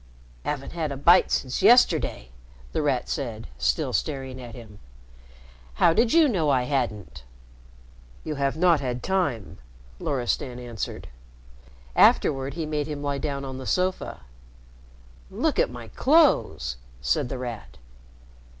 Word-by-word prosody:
"Haven't 140 -2 -3
had 160 -3 -3
a 140 - -4
bite 175 +6 +5
since 130 -2 -1
yesterday," 230 - +4 0.4
The - - -1
Rat 135 -4 0
said, 115 -7 -4
still 60 -1 0
staring 135 -3 -3
at 120 -2 -9
him. 110 -4 -12 1.0
"How 165 - +4
did 230 +5 +2
you 330 -2 +6
know 175 - +1
I 130 -3 +3
hadn't?" 105 - -3 1.0
"You 155 - -3
have 140 0 -1
not 170 -2 +4
had 125 -3 -4
time," 145 - -1 0.4
Loristan 125 -1 -2
answered. 120 -3 -6 0.9
Afterward 135 0 +3
he 165 -2 -3
made 150 -1 -2
him 145 -2 -5
lie 140 -1 -2
down 140 -1 -3
on 130 -1 -6
the 130 - -7
sofa. 185 0 -1 1.1
"Look - - -1
at - - +3
my 120 -2 -9
clothes," 165 - +2 0.2
said 65 - 0
The 130 - -4
Rat. 120 -4 -7
135 Hz, 135 wpm, -25 LUFS, 120-155 Hz, 1.1 s, you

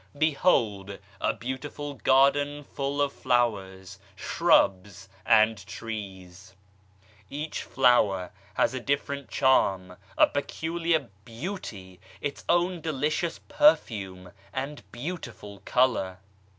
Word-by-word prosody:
Behold 115 - +1 0.2
a - - +1
beautiful 140 +3 -6
garden 145 +2 +3
full 140 0 -4
of 140 -1 -2
flowers, 100 -6 -1 0.2
shrubs 95 0 +2 0.2
and 110 -1 +4
trees. 95 -4 -8 0.7
Each 150 +2 -4
flower 105 -8 +2 0.2
has - - +2
a 130 - -3
different 140 0 -2
charm, 95 -9 +2 0.2
a - - +8
peculiar 160 0 -1
beauty, 115 - -7 0.2
its 140 +4 -5
own 175 0 +2
delicious 155 +2 -1
perfume 105 - +2 0.2
and 140 +3 -4
beautiful 120 - -7
colour. 120 -8 +1
125 Hz, 95 wpm, -27 LUFS, 100-145 Hz, 0.7 s, a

